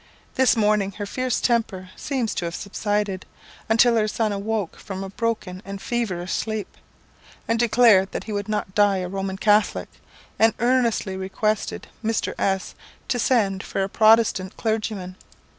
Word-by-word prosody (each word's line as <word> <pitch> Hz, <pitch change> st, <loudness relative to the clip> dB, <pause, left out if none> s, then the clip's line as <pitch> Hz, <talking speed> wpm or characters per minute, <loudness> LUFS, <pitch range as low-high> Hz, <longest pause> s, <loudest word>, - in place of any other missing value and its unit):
This 260 Hz, -2 st, +3 dB
morning 210 Hz, -2 st, +2 dB
her 205 Hz, +1 st, -5 dB
fierce 255 Hz, +3 st, -1 dB
temper 195 Hz, -6 st, 0 dB
seems 260 Hz, -6 st, -2 dB
to 175 Hz, -, -3 dB
have 170 Hz, 0 st, -4 dB
subsided, 205 Hz, -1 st, -2 dB, 0.5 s
until 230 Hz, +1 st, +5 dB
her 215 Hz, -1 st, +2 dB
son 215 Hz, 0 st, 0 dB
awoke 205 Hz, -2 st, -2 dB
from 195 Hz, -2 st, -6 dB
a 195 Hz, -, -7 dB
broken 205 Hz, -5 st, -3 dB
and 195 Hz, 0 st, -7 dB
feverish 190 Hz, -7 st, -2 dB
sleep, 220 Hz, -2 st, -3 dB, 0.7 s
and 230 Hz, 0 st, +1 dB
declared 225 Hz, -5 st, +5 dB
that -, -, -4 dB
he 220 Hz, -, -7 dB
would 205 Hz, 0 st, -3 dB
not 210 Hz, -3 st, -2 dB
die 205 Hz, -1 st, +4 dB
a 180 Hz, -1 st, -3 dB
Roman 195 Hz, 0 st, -3 dB
Catholic, 210 Hz, +1 st, +2 dB, 0.5 s
and 225 Hz, 0 st, +4 dB
earnestly 235 Hz, -5 st, +1 dB
requested 195 Hz, +3 st, -2 dB, 0.2 s
Mr. 225 Hz, 0 st, -1 dB
S 190 Hz, -1 st, 0 dB, 0.4 s
to 250 Hz, -2 st, 0 dB
send 205 Hz, -6 st, +2 dB
for 195 Hz, -, -2 dB
a 190 Hz, -, -2 dB
Protestant 215 Hz, -3 st, +3 dB
clergyman. 215 Hz, -4 st, -2 dB
210 Hz, 155 wpm, -23 LUFS, 195-225 Hz, 0.7 s, until